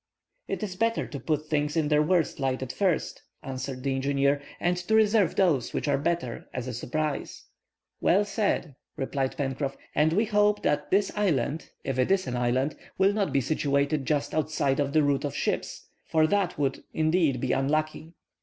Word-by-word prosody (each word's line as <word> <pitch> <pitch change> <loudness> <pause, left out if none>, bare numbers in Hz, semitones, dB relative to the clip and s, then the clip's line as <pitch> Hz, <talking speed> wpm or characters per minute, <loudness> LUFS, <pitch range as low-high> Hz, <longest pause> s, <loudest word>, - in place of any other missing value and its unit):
"It - - -3
is 190 -3 -4
better 230 +4 0
to 140 - -7
put 155 0 -1
things 150 0 -1
in 155 -2 +1
their 150 0 +4
worst 165 -1 +1
light 130 -1 -1
at 130 - -5
first," 190 -5 0 0.2
answered 130 -1 -5
the 135 -1 0
engineer; 140 +1 +1 0.2
"and 175 +1 +1
to 180 +5 0
reserve 215 -3 +4
those 155 -11 +2
which - - -2
are 145 - +2
better, 145 -6 -2
as 125 0 -3
a 125 - -4
surprise." 150 +5 -3 0.6
"Well 200 +4 +3
said," 200 -7 -1 0.2
replied 135 0 -2
Pencroff. 135 0 -2 0.2
"And 155 +2 +3
we 215 +6 +3
hope 210 -1 +2
that 145 0 0
this 195 +1 +2
island, 160 - 0
if 135 -1 -2
it 130 - +2
is 195 -1 +2
an 125 -2 -3
island, 125 +4 0 0.2
will 195 +1 +4
not 205 -2 0
be 140 - +2
situated 140 0 0
just 150 -2 0
outside 150 -3 0
of 140 -1 0
the 155 -1 +4
route 140 -1 +1
of 145 - -3
ships; - - -3 0.2
for 160 -1 +3
that 190 +1 0
would, 135 -2 -1
indeed, 155 -4 +2
be 125 0 -1
unlucky." 155 +4 -1
150 Hz, 185 wpm, -27 LUFS, 135-180 Hz, 0.6 s, their